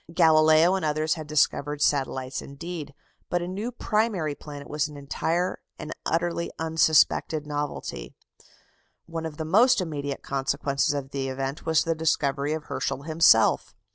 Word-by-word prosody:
Galileo 160 Hz, 0 st, +5 dB
and 190 Hz, -, -1 dB
others 155 Hz, +1 st, +1 dB
had 155 Hz, -3 st, -7 dB
discovered 145 Hz, -1 st, +1 dB
satellites 135 Hz, -2 st, 0 dB
indeed, 150 Hz, 0 st, -7 dB, 0.3 s
but 175 Hz, -, +1 dB
a -, -, -4 dB
new 205 Hz, +7 st, -4 dB
primary 210 Hz, -9 st, 0 dB
planet 145 Hz, -1 st, -10 dB
was 150 Hz, 0 st, -1 dB
an 150 Hz, -1 st, -11 dB
entire 165 Hz, +5 st, -2 dB, 0.2 s
and 155 Hz, -, -7 dB, 0.2 s
utterly 170 Hz, 0 st, -1 dB
unsuspected 160 Hz, -1 st, +2 dB
novelty. 145 Hz, -, -5 dB, 0.9 s
One 165 Hz, -1 st, -4 dB
of 150 Hz, -2 st, -10 dB
the 160 Hz, -, -3 dB
most 230 Hz, +10 st, +5 dB
immediate 145 Hz, -5 st, -4 dB
consequences 140 Hz, +1 st, 0 dB
of 140 Hz, -1 st, -5 dB
the 135 Hz, -1 st, -2 dB
event 135 Hz, +4 st, -4 dB
was 160 Hz, -1 st, +3 dB
the 165 Hz, -, 0 dB
discovery 150 Hz, -2 st, 0 dB
of 155 Hz, -1 st, -4 dB
Herschel 140 Hz, -, -3 dB
himself. 155 Hz, -8 st, +4 dB
155 Hz, 145 wpm, -26 LUFS, 140-165 Hz, 0.9 s, Galileo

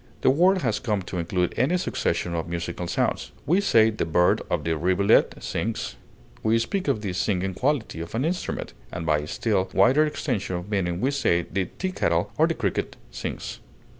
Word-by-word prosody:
The -, -, +5 dB
word 180 Hz, +6 st, +3 dB
has 110 Hz, -4 st, +1 dB
come 105 Hz, -4 st, -1 dB
to 90 Hz, 0 st, -4 dB
include 90 Hz, +1 st, 0 dB
any 145 Hz, +9 st, +3 dB
succession 90 Hz, -, -1 dB
of 85 Hz, 0 st, -3 dB
musical 85 Hz, +1 st, -3 dB
sounds; -, -, -1 dB
we 180 Hz, +6 st, +3 dB
say 110 Hz, -, +5 dB
the 105 Hz, -, -2 dB
bird 90 Hz, +2 st, +3 dB
or -, -, +2 dB
the 80 Hz, -1 st, -1 dB
rivulet 95 Hz, +6 st, +3 dB
sings; 115 Hz, -1 st, -3 dB, 0.5 s
we 110 Hz, +1 st, +3 dB
speak 165 Hz, +12 st, -1 dB
of 135 Hz, -7 st, +1 dB
"the 100 Hz, -4 st, -3 dB
singing 95 Hz, 0 st, 0 dB
quality" 125 Hz, -, -1 dB
of 85 Hz, +5 st, -6 dB
an 125 Hz, +5 st, 0 dB
instrument, 175 Hz, +2 st, -3 dB, 0.2 s
and 90 Hz, -2 st, -5 dB
by 75 Hz, -1 st, +1 dB
still 95 Hz, +3 st, 0 dB
wider 135 Hz, +5 st, +5 dB
extension 125 Hz, -11 st, -2 dB
of 90 Hz, +4 st, -6 dB
meaning 90 Hz, -3 st, 0 dB
we 135 Hz, -, +2 dB
say 85 Hz, -11 st, +2 dB
the 95 Hz, +1 st, -2 dB
teakettle 185 Hz, 0 st, 0 dB
or -, -, +6 dB
the -, -, -1 dB
cricket -, -, -2 dB, 0.2 s
sings. -, -, -5 dB
100 Hz, 185 wpm, -25 LUFS, 90-130 Hz, 0.5 s, or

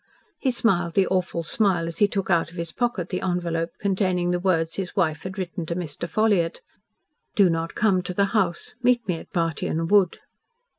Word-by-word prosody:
He 270 Hz, -, +1 dB
smiled 180 Hz, -9 st, +1 dB
the 195 Hz, -, +4 dB
awful 185 Hz, -3 st, -1 dB
smile 175 Hz, -1 st, +1 dB
as 165 Hz, -, -6 dB
he 205 Hz, -, +6 dB
took 195 Hz, -2 st, -2 dB
out 170 Hz, -1 st, +2 dB
of 175 Hz, -, -13 dB
his 170 Hz, -1 st, -3 dB
pocket 235 Hz, -7 st, -1 dB
the 180 Hz, -, -2 dB
envelope 170 Hz, -2 st, -1 dB
containing 185 Hz, -3 st, 0 dB
the 180 Hz, -, 0 dB
words 165 Hz, -3 st, +1 dB
his 190 Hz, -2 st, -4 dB
wife 160 Hz, -5 st, +1 dB
had 185 Hz, +2 st, -7 dB
written 180 Hz, -1 st, -4 dB
to 170 Hz, -, -2 dB
Mr. 170 Hz, -1 st, -5 dB
Ffolliott, 205 Hz, -7 st, +1 dB, 0.7 s
"Do 195 Hz, -5 st, +5 dB
not 165 Hz, 0 st, -2 dB
come 195 Hz, -4 st, +3 dB
to 180 Hz, +1 st, -5 dB
the 200 Hz, -, +3 dB
house. 185 Hz, -6 st, 0 dB
Meet 240 Hz, -2 st, +2 dB
me 180 Hz, -3 st, 0 dB
at -, -, -12 dB
Bartyon 165 Hz, -1 st, -1 dB
Wood." 200 Hz, -4 st, +4 dB
180 Hz, 195 wpm, -24 LUFS, 170-200 Hz, 0.7 s, he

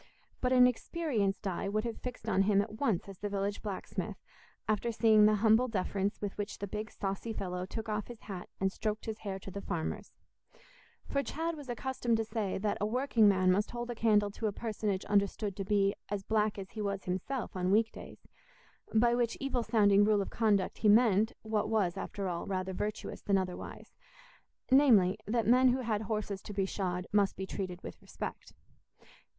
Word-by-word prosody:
But 250 Hz, -, +1 dB
an 250 Hz, -1 st, +7 dB
experienced 245 Hz, -, 0 dB
eye 195 Hz, +1 st, -2 dB
would 215 Hz, +1 st, 0 dB
have 230 Hz, -2 st, -5 dB
fixed 250 Hz, -1 st, -7 dB
on 195 Hz, -, +3 dB
him 200 Hz, 0 st, +3 dB
at 215 Hz, +2 st, -3 dB
once 220 Hz, -12 st, 0 dB
as 195 Hz, -2 st, -10 dB
the 205 Hz, -, -3 dB
village 200 Hz, 0 st, -2 dB
blacksmith, 200 Hz, -3 st, -4 dB, 0.5 s
after 215 Hz, +2 st, 0 dB
seeing 220 Hz, -2 st, +5 dB
the 215 Hz, -, +4 dB
humble 220 Hz, +4 st, +4 dB
deference 200 Hz, -2 st, -1 dB
with 205 Hz, -2 st, -4 dB
which 205 Hz, +1 st, -3 dB
the 200 Hz, -, -4 dB
big 210 Hz, +2 st, -5 dB
saucy 195 Hz, +3 st, -4 dB
fellow 180 Hz, -2 st, -4 dB
took 225 Hz, +3 st, -5 dB
off 210 Hz, -1 st, -2 dB
his 240 Hz, -2 st, -10 dB
hat 190 Hz, -4 st, -7 dB
and 190 Hz, 0 st, +1 dB
stroked 215 Hz, +2 st, -3 dB
his 220 Hz, -1 st, -4 dB
hair 195 Hz, -3 st, -4 dB
to 195 Hz, 0 st, -9 dB
the 200 Hz, -, -5 dB
farmers; 170 Hz, -5 st, -4 dB, 1.0 s
for 280 Hz, -, 0 dB
Chad 325 Hz, +4 st, -3 dB
was 290 Hz, -4 st, -10 dB
accustomed 240 Hz, -1 st, -1 dB
to 225 Hz, -, -1 dB
say 215 Hz, -3 st, -2 dB
that 205 Hz, +1 st, -1 dB
a -, -, +2 dB
working 235 Hz, -2 st, +3 dB
man 185 Hz, -2 st, +3 dB
must 205 Hz, +3 st, +1 dB
hold 240 Hz, 0 st, -4 dB
a -, -, -2 dB
candle 210 Hz, -3 st, +3 dB
to 220 Hz, +2 st, -3 dB
a -, -, 0 dB
personage 210 Hz, -2 st, -2 dB
understood 200 Hz, 0 st, +1 dB
to 195 Hz, -, -3 dB
be 200 Hz, 0 st, +2 dB, 0.2 s
as 205 Hz, -1 st, -3 dB
black 215 Hz, 0 st, +1 dB
as 190 Hz, -1 st, -7 dB
he 220 Hz, -, -5 dB
was 200 Hz, -1 st, -2 dB
himself 190 Hz, +7 st, -3 dB
on 180 Hz, 0 st, 0 dB
weekdays; 220 Hz, +3 st, -1 dB, 0.7 s
by 235 Hz, +2 st, +5 dB
which 240 Hz, -1 st, 0 dB
evil 270 Hz, -3 st, -1 dB
sounding 205 Hz, -4 st, +4 dB
rule 205 Hz, -1 st, +3 dB
of -, -, -8 dB
conduct 210 Hz, -4 st, +1 dB
he 215 Hz, -, +4 dB
meant 220 Hz, -1 st, +5 dB
what 215 Hz, -1 st, -1 dB
was, 195 Hz, -5 st, +1 dB
after 195 Hz, 0 st, -4 dB
all, 170 Hz, -2 st, -3 dB
rather 190 Hz, -1 st, -2 dB
virtuous 210 Hz, +3 st, -4 dB
than 200 Hz, -2 st, +2 dB
otherwise, 185 Hz, -1 st, -5 dB, 0.8 s
namely, 230 Hz, -9 st, +5 dB
that 230 Hz, +1 st, +1 dB
men 255 Hz, +3 st, +5 dB
who 255 Hz, +1 st, +2 dB
had 220 Hz, -3 st, -1 dB
horses 210 Hz, -3 st, -3 dB
to 210 Hz, -, -8 dB
be 195 Hz, -1 st, +1 dB
shod 180 Hz, -2 st, -2 dB
must 200 Hz, -1 st, +3 dB
be 190 Hz, -, -3 dB
treated 185 Hz, -2 st, -5 dB
with -, -, -9 dB
respect. -, -, -7 dB
210 Hz, 195 wpm, -32 LUFS, 195-225 Hz, 1.0 s, an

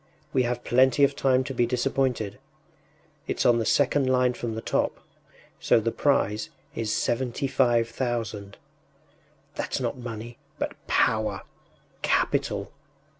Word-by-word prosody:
We 130 Hz, -, +3 dB
have 120 Hz, 0 st, -3 dB
plenty 130 Hz, +3 st, +4 dB
of 140 Hz, 0 st, +4 dB
time 130 Hz, -1 st, +2 dB
to 135 Hz, +1 st, -5 dB
be 120 Hz, -1 st, +2 dB
disappointed. 125 Hz, -3 st, -1 dB, 0.9 s
It’s -, -, -1 dB
on 120 Hz, -1 st, +5 dB
the 115 Hz, -, -1 dB
second 140 Hz, -1 st, +3 dB
line 125 Hz, -1 st, +3 dB
from 120 Hz, -2 st, -4 dB
the 110 Hz, -, -4 dB
top, -, -, -1 dB, 0.6 s
so -, -, +4 dB
the 115 Hz, +1 st, -1 dB
prize 110 Hz, -7 st, +1 dB, 0.2 s
is 110 Hz, -2 st, -2 dB
seventy 125 Hz, +4 st, -1 dB
five 120 Hz, -3 st, +2 dB
thousand. 115 Hz, -4 st, -3 dB, 1.0 s
That’s -, -, -2 dB
not -, -, -3 dB
money, 120 Hz, 0 st, -7 dB, 0.2 s
but -, -, -2 dB
power, 105 Hz, -3 st, +1 dB, 0.6 s
capital! -, -, 0 dB
120 Hz, 130 wpm, -26 LUFS, 115-130 Hz, 1.0 s, on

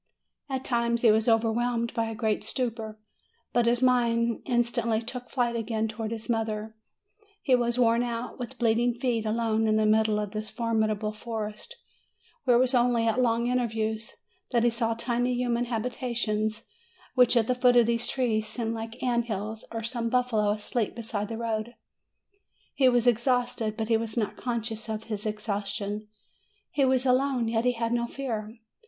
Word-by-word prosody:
At 265 Hz, -1 st, -3 dB
times 235 Hz, -1 st, 0 dB
he 225 Hz, -, +7 dB
was 220 Hz, +2 st, +3 dB
overwhelmed 230 Hz, +1 st, +1 dB
by 230 Hz, -, 0 dB
a 225 Hz, -, -5 dB
great 215 Hz, -1 st, 0 dB
stupor. 225 Hz, -4 st, -3 dB, 0.6 s
But 240 Hz, -1 st, +3 dB
his 240 Hz, +1 st, +2 dB
mind 235 Hz, -2 st, +2 dB
instantly 240 Hz, -2 st, +1 dB
took 250 Hz, +1 st, -7 dB
flight 240 Hz, -3 st, 0 dB
again 225 Hz, -1 st, -1 dB
towards 220 Hz, 0 st, -5 dB
his 225 Hz, -1 st, -6 dB
mother. 220 Hz, -2 st, -2 dB, 0.7 s
He 265 Hz, -, +2 dB
was 240 Hz, -1 st, +2 dB
worn 235 Hz, -1 st, +4 dB
out, 240 Hz, +1 st, -4 dB
with 250 Hz, +1 st, -6 dB
bleeding 235 Hz, 0 st, +2 dB
feet, 240 Hz, -3 st, -1 dB
alone 225 Hz, 0 st, +1 dB
in 215 Hz, -, +3 dB
the 215 Hz, 0 st, +3 dB
middle 215 Hz, 0 st, +3 dB
of 210 Hz, -1 st, -3 dB
this 215 Hz, 0 st, -4 dB
formidable 220 Hz, -2 st, 0 dB
forest, 215 Hz, -1 st, -6 dB, 0.7 s
where 245 Hz, -3 st, +5 dB
it -, -, +4 dB
was 255 Hz, +1 st, +2 dB
only 240 Hz, -2 st, +3 dB
at 230 Hz, +2 st, +2 dB
long 235 Hz, -1 st, +2 dB
intervals 225 Hz, -3 st, -1 dB, 0.3 s
that 235 Hz, -2 st, +2 dB
he 240 Hz, -, +4 dB
saw 230 Hz, -1 st, 0 dB
tiny 245 Hz, +1 st, 0 dB
human 245 Hz, -1 st, 0 dB
habita 240 Hz, +1 st, -3 dB
tions, 215 Hz, -1 st, -1 dB, 0.5 s
which 250 Hz, -1 st, +5 dB
at 225 Hz, -, +4 dB
the 250 Hz, -, +1 dB
foot 250 Hz, 0 st, +4 dB
of 240 Hz, -1 st, +6 dB
these 235 Hz, 0 st, 0 dB
trees 225 Hz, -5 st, 0 dB
seemed 225 Hz, +1 st, -3 dB
like 225 Hz, 0 st, -5 dB
the 240 Hz, -, -11 dB
ant 240 Hz, -2 st, +1 dB
hills, 215 Hz, 0 st, -4 dB
or 225 Hz, 0 st, -4 dB
some 230 Hz, 0 st, -2 dB
buffalo 235 Hz, -4 st, +2 dB
asleep 215 Hz, +2 st, -1 dB
beside 220 Hz, -3 st, -3 dB
the 225 Hz, +1 st, -5 dB
road; 230 Hz, 0 st, -3 dB, 1.0 s
he 260 Hz, -2 st, +4 dB
was 245 Hz, -1 st, +2 dB
exhausted, 240 Hz, -2 st, +1 dB
but 220 Hz, 0 st, -2 dB
he 225 Hz, -, +4 dB
was 225 Hz, 0 st, -4 dB
not 215 Hz, -3 st, -1 dB
conscious 230 Hz, -2 st, -3 dB
of 220 Hz, 0 st, -3 dB
his 215 Hz, -1 st, -4 dB
ex 210 Hz, 0 st, -4 dB
haustion; 205 Hz, 0 st, -3 dB, 0.6 s
he 280 Hz, -, +1 dB
was 260 Hz, 0 st, +3 dB
alone, 255 Hz, -2 st, +2 dB
yet 225 Hz, +1 st, 0 dB
he 250 Hz, -1 st, +2 dB
felt 230 Hz, 0 st, -1 dB
no 235 Hz, 0 st, 0 dB
fear. 230 Hz, -4 st, -5 dB
230 Hz, 180 wpm, -27 LUFS, 220-245 Hz, 1.0 s, he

